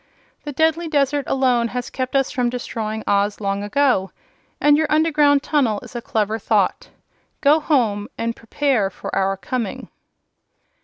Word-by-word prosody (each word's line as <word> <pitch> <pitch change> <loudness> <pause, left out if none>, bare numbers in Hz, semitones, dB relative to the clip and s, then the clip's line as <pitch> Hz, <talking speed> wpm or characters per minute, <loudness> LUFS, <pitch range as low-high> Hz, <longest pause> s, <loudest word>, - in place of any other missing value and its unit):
The 295 - -4
deadly 320 +3 +1
desert 285 -2 +1
alone 250 -3 +2
has 245 +1 -5
kept 255 +1 -3
us 270 -1 +2
from 250 -3 0
destroying 220 -3 -4
Oz 205 0 +1
long 200 -1 -2
ago, 210 -4 +1 0.5
and 295 0 +5
your 315 +1 +1
underground 300 -2 +3
tunnel 255 -9 +1
is - - -13
a 240 - -3
clever 220 -1 -1
thought. 205 -2 0 0.5
Go 295 +2 +4
home, 230 -10 +1
and 230 0 -2
prepare 230 -3 0
for - - -7
our 195 0 +1
coming!" 220 +3 -4
250 Hz, 150 wpm, -21 LUFS, 215-290 Hz, 0.5 s, and